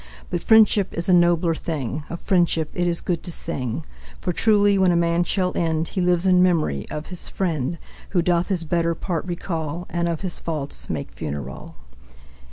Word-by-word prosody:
But 175 -2 -1
Friendship 215 -3 +4
is 170 +3 -1
a 185 - +4
nobler 175 -1 +4
thing, 155 -3 -3
Of 170 - -5
Friendship 170 -4 +1
it 175 -1 0
is 170 -1 -1
good 170 -3 -1
to 175 - -5
sing. 145 -4 -4 0.3
For 180 - -2
truly, 205 0 +4
when 185 -1 +4
a - - +2
man 170 0 +2
shall 180 0 0
end, 160 -1 0
He 190 - -2
lives 180 0 +2
in 180 -1 +5
memory 160 - +1
of 150 +1 -5
his 180 - -2
friend, 165 -4 -2 0.3
Who 175 -3 +1
doth 175 0 +2
his 185 -4 0
better 170 +1 0
part 170 -1 -3
recall, 170 -2 -4
And 170 0 0
of 165 -2 -3
his 185 -3 -4
faults 150 -4 -2
make 70 -3 -4
funeral. 70 0 -6
170 Hz, 185 wpm, -23 LUFS, 160-180 Hz, 0.3 s, in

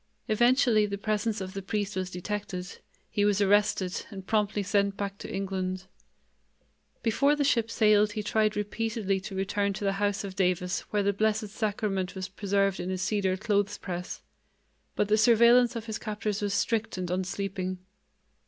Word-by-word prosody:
Eventually 240 -1 +4
the 200 0 -3
presence 215 +1 -1
of 190 0 -5
the 195 - -4
priest 205 0 -2
was 185 -1 -2
detected; 185 -1 -5 0.3
he 205 - 0
was 205 -1 +3
arrested 200 -2 +2
and 195 -3 -9
promptly 210 -1 +1
sent 200 +1 +1
back 200 0 -4
to - - -7
England. 190 -1 -3 1.2
Before 280 +6 +3
the 295 - 0
ship 230 -5 +2
sailed 210 -2 +4
he 210 -1 -3
tried 215 0 +1
repeatedly 210 -1 -1
to 195 +1 -8
return 200 +1 0
to 205 - -6
the 195 - +2
house 205 0 +1
of 195 -2 -6
Davis 180 -1 +1
where 205 -1 +1
the 200 0 +2
Blessed 215 +1 0
Sacrament 200 -3 -2
was 185 0 -5
preserved 195 0 0
in 180 - -3
a 185 - -1
cedar 190 0 0
clothes 205 -1 0
press, 180 -1 -6 0.7
but 210 - +1
the 215 +1 +3
surveillance 235 +2 +5
of 230 -1 -4
his 220 -2 -4
captors 210 -1 -3
was 200 -1 0
strict 225 -2 0
and 180 -1 -3
unsleeping. 185 0 -2
205 Hz, 170 wpm, -28 LUFS, 190-215 Hz, 1.2 s, surveillance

